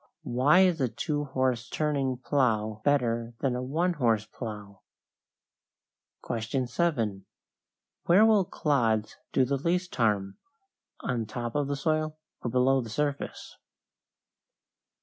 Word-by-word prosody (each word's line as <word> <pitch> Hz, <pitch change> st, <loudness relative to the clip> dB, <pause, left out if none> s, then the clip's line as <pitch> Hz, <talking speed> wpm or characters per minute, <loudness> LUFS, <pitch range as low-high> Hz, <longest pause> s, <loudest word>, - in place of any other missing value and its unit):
Why 140 Hz, +9 st, +4 dB
is 180 Hz, -5 st, +3 dB
a 130 Hz, -, +2 dB
two 145 Hz, +6 st, -2 dB
horse 130 Hz, -3 st, -1 dB
turning 140 Hz, -4 st, 0 dB
plow 115 Hz, -4 st, 0 dB
better 120 Hz, -4 st, +1 dB
than 130 Hz, -3 st, +1 dB
a 125 Hz, -, -2 dB
one 165 Hz, +8 st, 0 dB
horse 115 Hz, -8 st, +1 dB
plow? 105 Hz, -5 st, -8 dB, 1.5 s
7. 115 Hz, -, -1 dB, 0.8 s
Where 190 Hz, +6 st, +6 dB
will 215 Hz, -4 st, +4 dB
clods 115 Hz, -11 st, 0 dB
do 130 Hz, -, +3 dB
the 140 Hz, +2 st, 0 dB
least 180 Hz, +5 st, -1 dB
harm 100 Hz, -4 st, 0 dB, 0.6 s
on 115 Hz, -3 st, -2 dB
top 120 Hz, +1 st, -4 dB
of 145 Hz, -1 st, 0 dB
the 140 Hz, -, -1 dB
soil 155 Hz, +2 st, -1 dB, 0.2 s
or 120 Hz, -, -2 dB
below 130 Hz, +2 st, +3 dB
the 115 Hz, -, -7 dB
surface? 145 Hz, +4 st, -3 dB
130 Hz, 120 wpm, -28 LUFS, 115-150 Hz, 1.5 s, Where